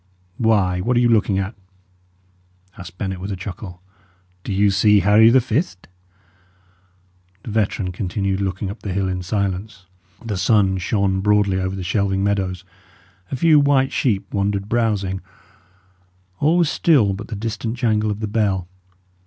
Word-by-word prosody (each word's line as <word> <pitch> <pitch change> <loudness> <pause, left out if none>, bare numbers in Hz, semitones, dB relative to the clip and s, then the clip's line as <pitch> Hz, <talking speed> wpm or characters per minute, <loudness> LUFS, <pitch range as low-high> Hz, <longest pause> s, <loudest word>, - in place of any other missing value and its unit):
"Why, 100 -6 +2
what 120 +5 +1
are - - +5
you 120 -1 +3
looking 105 -3 +2
at?" 95 +3 -2 1.2
asked 90 -2 -11
Bennet, 95 -1 -4
with 95 +3 -5
a - - -2
chuckle. 90 -1 -8 0.6
"Do, - - -5
you 100 +1 +3
see 105 +1 +4
Harry 105 +2 +6
the 130 +3 +5
Fift?" 110 - -2 1.6
The 115 - -7
veteran 100 -3 -1
continued 95 +1 -2
looking 95 0 -3
up 105 - -10
the 100 - -4
hill 95 0 0
in 90 -1 -3
silence. 100 +1 -3 0.4
The 105 -4 -3
sun 95 0 +2
shone 95 0 0
broadly 105 -2 +2
over 95 +1 -2
the 95 - -5
shelving 95 +1 0
meadows; 95 -2 -1 0.7
a - - -1
few 155 +3 +5
white 140 -2 +2
sheep 105 -6 0
wandered 100 0 -1
browsing; 105 -5 -1 1.2
all 155 +4 +3
was 170 -4 +3
still 130 -12 +3
but 105 +3 -7
the 110 - -6
distant 115 +2 -4
jangle 110 -3 +1
of 105 +1 -4
the 110 - -2
bell. 100 -4 0
100 Hz, 155 wpm, -20 LUFS, 95-110 Hz, 1.6 s, Harry